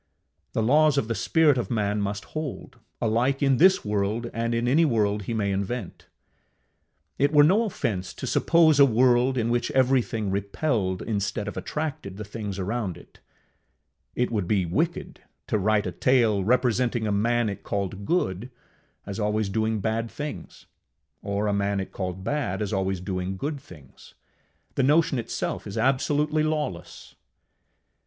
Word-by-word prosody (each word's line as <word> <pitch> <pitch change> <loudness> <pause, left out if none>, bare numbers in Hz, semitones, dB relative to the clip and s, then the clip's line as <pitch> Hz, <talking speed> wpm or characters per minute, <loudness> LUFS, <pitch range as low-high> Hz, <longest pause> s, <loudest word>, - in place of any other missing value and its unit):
The 110 - 0
laws 150 +4 +4
of 115 - +1
the 115 - -1
spirit 150 +2 +3
of 120 - -3
man 105 -3 0
must 100 +1 -3
hold, 155 -4 -6 0.2
alike 120 +5 +1
in 135 -2 +3
this 190 +6 +5
world 105 +3 -1
and 115 +1 -1
in 120 +1 0
any 150 +7 +4
world 105 -7 +1
he 115 - -3
may 100 -2 0
invent. 100 +1 -4 1.1
It 140 +1 +3
were 150 -1 +6
no 200 +9 +4
offence 110 - -3
to - - -6
suppose 160 -3 +4
a - - +9
world 125 +2 +3
in 115 -1 0
which 120 0 0
everything 125 -5 +1
repelled 100 -1 -1
instead 100 -1 -2
of - - -5
attracted 145 -11 -4
the 105 - -5
things 105 -2 -6
around 100 -1 -3
it; - - -18 1.0
it 125 0 0
would 105 -6 -1
be 95 -3 +1
wicked 160 - -2 0.2
to 105 - 0
write 105 +1 +2
a 90 - -2
tale 110 0 +2
representing 125 0 +1
a 105 - 0
man 115 +3 +1
it 100 -2 -4
called 100 0 -3
good 110 - -1 0.6
as 100 +1 -6
always 105 -1 0
doing 110 +1 -1
bad 115 +2 -1
things, 150 +4 -7 0.6
or 100 +1 -2
a 105 - +1
man 100 0 0
it 95 - -5
called 95 -1 -5
bad 145 +4 -2
as 105 - -4
always 95 -1 -1
doing 90 0 -4
good 145 +5 -3
things: 75 - -16 0.6
the - - 0
notion 150 0 +3
itself 115 - -4
is 100 - -6
absolutely 145 +5 +1
lawless. 150 - -3
115 Hz, 160 wpm, -25 LUFS, 100-135 Hz, 1.1 s, a